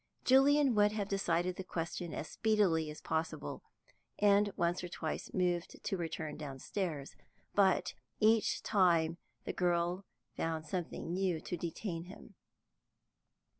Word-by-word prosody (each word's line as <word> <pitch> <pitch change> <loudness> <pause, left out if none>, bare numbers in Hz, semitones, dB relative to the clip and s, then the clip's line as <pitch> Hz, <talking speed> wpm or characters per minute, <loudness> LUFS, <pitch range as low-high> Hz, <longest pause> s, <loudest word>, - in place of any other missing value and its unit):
Julian 275 +1 +5
would 210 -1 +4
have 205 -2 -2
decided 180 -2 0
the 190 - -4
question 170 -1 -4
as 155 - -4
speedily 195 -8 +2
as 150 - -8
possible, 160 0 -3 0.6
and 205 0 +4
once 170 +1 +1
or - - -3
twice 160 -2 -4
moved 175 -2 -1
to - - -1
return 160 -3 -4
downstairs, 150 +1 -4 0.4
but 190 -2 +3 0.3
each 220 0 +3
time 170 -5 +3 0.2
the - - -4
girl 175 +1 +1 0.3
found 160 -1 -2
something 170 0 -4
new 185 -3 0
to - - -4
detain 170 0 -4
him. 185 - -12
175 Hz, 130 wpm, -34 LUFS, 165-200 Hz, 0.6 s, Julian